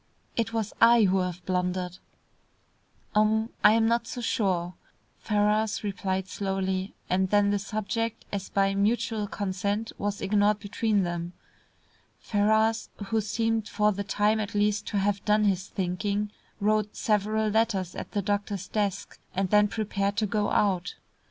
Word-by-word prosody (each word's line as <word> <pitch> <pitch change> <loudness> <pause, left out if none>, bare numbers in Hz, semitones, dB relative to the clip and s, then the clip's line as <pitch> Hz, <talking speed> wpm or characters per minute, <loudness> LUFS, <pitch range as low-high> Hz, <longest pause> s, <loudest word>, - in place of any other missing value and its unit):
It 225 -1 0
was 225 -2 -2
I 235 0 +7
who 190 -1 +3
have 180 -1 -3
blundered." 180 -1 -1 1.1
"Um 220 +1 +2
I 210 - +8
am 225 0 +3
not 235 +1 +1
so - - -5
sure," 185 -7 0 0.5
Ferrars 210 0 +1
replied 190 -2 -2
slowly, 190 0 -2
and 190 +1 +1
then 205 0 +3
the 205 - +1
subject 215 +2 -3
as 200 -2 -4
by 195 0 +2
mutual 215 +1 0
consent 200 +3 -2
was 205 0 -2
ignored 205 +1 +2
between 205 0 0
them. 175 0 -3 0.9
Ferrars, 220 +2 +1 0.2
who 225 +1 +2
seemed 225 +1 -1
for 210 0 +2
the 200 0 -3
time 210 +2 +1
at 210 -1 -4
least 205 0 +1
to 205 - -1
have 200 0 0
done 210 0 +3
his 190 -2 +1
thinking, 200 +2 -2 0.3
wrote 210 0 +1
several 215 +1 +1
letters 205 -5 +1
at - - -7
the 205 - 0
doctor's 200 -1 -2
desk, 205 -2 -2 0.2
and 190 -1 0
then 210 0 +5
prepared 200 -1 -2
to 220 - +2
go 210 0 0
out. 185 -3 +1
205 Hz, 150 wpm, -27 LUFS, 195-215 Hz, 1.1 s, I